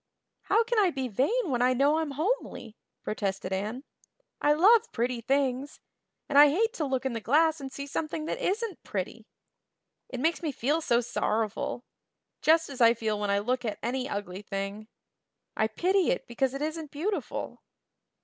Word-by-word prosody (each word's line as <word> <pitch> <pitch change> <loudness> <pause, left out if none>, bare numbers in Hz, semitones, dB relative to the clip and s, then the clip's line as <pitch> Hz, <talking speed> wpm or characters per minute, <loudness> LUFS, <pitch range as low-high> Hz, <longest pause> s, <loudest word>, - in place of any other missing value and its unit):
"How 435 +4 +3
can 465 0 +1
I 390 -3 +4
be 270 -5 -3
vain 290 - 0
when 245 -1 0
I 250 +1 +4
know 285 +5 +3
I'm 310 -3 -2
homely?" 330 - -2 0.3
protested 195 -3 -3
Anne. 215 +7 -3 0.6
"I 295 - +4
love 435 +9 +5
pretty 240 0 -1
things; 270 +2 0 0.5
and 280 - +4
I 295 0 +9
hate 445 +10 +1
to 315 - -2
look 265 -1 -2
in 265 - -1
the 230 - -4
glass 310 +6 +3
and 270 -1 -6
see 280 +1 -6
something 310 +2 -3
that - - -3
isn't 415 -1 -2
pretty. 210 +3 -5 0.8
It 255 - -5
makes 325 +5 +1
me 315 -3 -1
feel 285 +5 0
so 240 -5 +2
sorrowful 240 +3 -2 0.6
just 325 +1 +4
as 270 -3 -7
I 230 0 +7
feel 215 -2 -2
when 205 -1 -2
I 200 - +3
look 245 +5 -1
at 220 -3 -3
any 255 +3 -2
ugly 200 -3 -5
thing. 200 +1 -5 0.7
I 220 - +2
pity 365 - +1
it - - 0
because 260 +2 -1
it 280 - -3
isn't 315 0 -4
beautiful." 360 +9 -4
270 Hz, 180 wpm, -28 LUFS, 230-320 Hz, 0.8 s, I